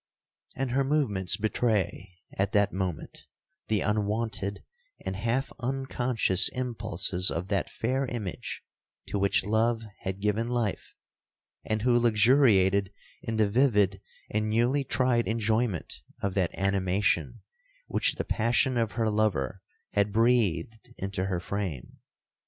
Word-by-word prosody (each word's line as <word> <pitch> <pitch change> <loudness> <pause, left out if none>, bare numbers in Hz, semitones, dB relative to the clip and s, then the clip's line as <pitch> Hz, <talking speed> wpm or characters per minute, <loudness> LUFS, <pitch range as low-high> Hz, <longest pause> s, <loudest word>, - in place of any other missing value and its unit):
And 135 -2 -2
her 135 +2 +2
movements 105 - 0
betray, 105 -3 -1 0.2
at 95 +1 -1
that 100 0 +3
moment, 95 -4 -4 0.4
the 105 -3 +1
unwonted 105 -1 -1 0.4
and 95 - -2
half 115 +6 -1
unconscious 125 -6 +1
impulses 110 -7 0
of 90 +3 -3
that 100 -1 0
fair 130 +3 -1
image 110 -8 -5 0.5
to 100 - -1
which 100 -1 +2
love 115 +2 +1 0.2
had 95 0 -4
given 105 +3 0
life, 120 -5 -2 0.7
and 110 0 -2
who 120 -1 +4
luxuriated 105 -4 +4 0.3
in 115 - -3
the 110 -1 +3
vivid 100 -5 +2 0.3
and 110 0 0
newly 120 +6 +2
tried 125 -3 +1
enjoyment 110 -3 -1 0.2
of 100 -1 -2
that 90 -3 0
animation 95 0 0 0.4
which - - +1
the - - -3
passion 120 +3 +1
of 115 -2 0
her 115 -1 0
lover 95 -7 0 0.3
had 100 0 +1
breathed 115 0 +1
into 95 0 -3
her 95 -2 -1
frame. 85 -7 -5
105 Hz, 125 wpm, -28 LUFS, 95-120 Hz, 0.7 s, who